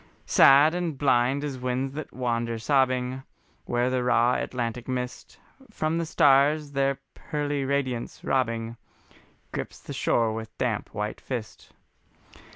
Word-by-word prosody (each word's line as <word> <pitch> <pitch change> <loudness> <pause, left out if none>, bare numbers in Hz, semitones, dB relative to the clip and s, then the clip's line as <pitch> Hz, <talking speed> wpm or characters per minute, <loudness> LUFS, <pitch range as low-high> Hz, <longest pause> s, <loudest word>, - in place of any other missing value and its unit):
Sad 145 +4 +6
and 175 -5 -2
blind 135 0 +2
as 140 -3 -4
winds 130 +2 -2
that 155 0 -6
wander 115 -2 -2
sobbing, 130 +1 +1 0.4
Where 120 +1 0
the 130 -1 0
raw 120 0 +3
Atlantic 120 -2 -3
mist 125 -1 -5 0.3
From 165 -5 -1
the 165 - -2
stars 145 0 +4
their 135 -1 +1 0.2
pearly 145 -2 -3
radiance 130 -3 -2
robbing, 115 -3 -1 0.7
Grips - - -5
the - - -8
shore 115 -2 +1
with 110 0 -7
damp 115 -5 -2
white 105 +1 -3
fist. 120 -4 -6
130 Hz, 130 wpm, -26 LUFS, 120-140 Hz, 0.7 s, Sad